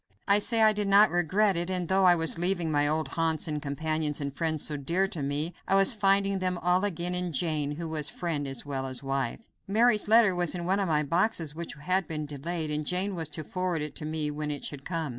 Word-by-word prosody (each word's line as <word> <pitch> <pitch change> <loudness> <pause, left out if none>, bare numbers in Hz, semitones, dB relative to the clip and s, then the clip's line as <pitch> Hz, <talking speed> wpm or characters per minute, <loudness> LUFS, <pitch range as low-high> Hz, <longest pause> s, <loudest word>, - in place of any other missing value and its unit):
I 200 +1 +4
say 225 +1 +3
I 215 0 +6
did 210 -1 -2
not 200 +2 +6
regret 185 +4 +2
it, 170 +1 -2
and 180 -2 -2
though 190 +1 +2
I 175 -1 +6
was 165 0 0
leaving 175 -2 0
my 145 -1 +2
old 155 +1 0
haunts 165 -1 0
and 150 -1 -3
companions 155 +1 -1
and 140 -1 -4
friends 160 -2 -1
so 150 - 0
dear 170 +7 0
to 175 -8 -6
me, 145 +5 -2
I 195 - +3
was 195 +5 +5
finding 195 -2 +2
them 185 -1 -1
all 180 +2 +1
again 180 -3 -2
in 180 -1 -1
Jane, 150 -1 -1
who 165 +2 -5
was 155 -2 -1
friend 155 -5 -3
as 135 0 -4
well 135 -2 -3
as 130 +1 -2
wife. 135 - -2 0.3
Mary's 215 +1 +3
letter 220 -2 +5
was 175 -1 0
in 175 -1 -4
one 190 +3 +1
of 195 - 0
my 150 -2 +1
boxes 165 0 0
which 170 +1 -7
had 180 +4 -1
been 155 -2 -4
delayed, 155 +2 -4
and 150 0 -1
Jane 185 +5 -1
was 165 -4 -2
to 155 +1 -6
forward 180 -1 -2
it 150 - -5
to 150 - -5
me 155 -1 -2
when 150 0 -4
it 145 -2 -4
should 140 -2 -6
come. 165 -4 -3
165 Hz, 245 wpm, -28 LUFS, 150-190 Hz, 0.3 s, I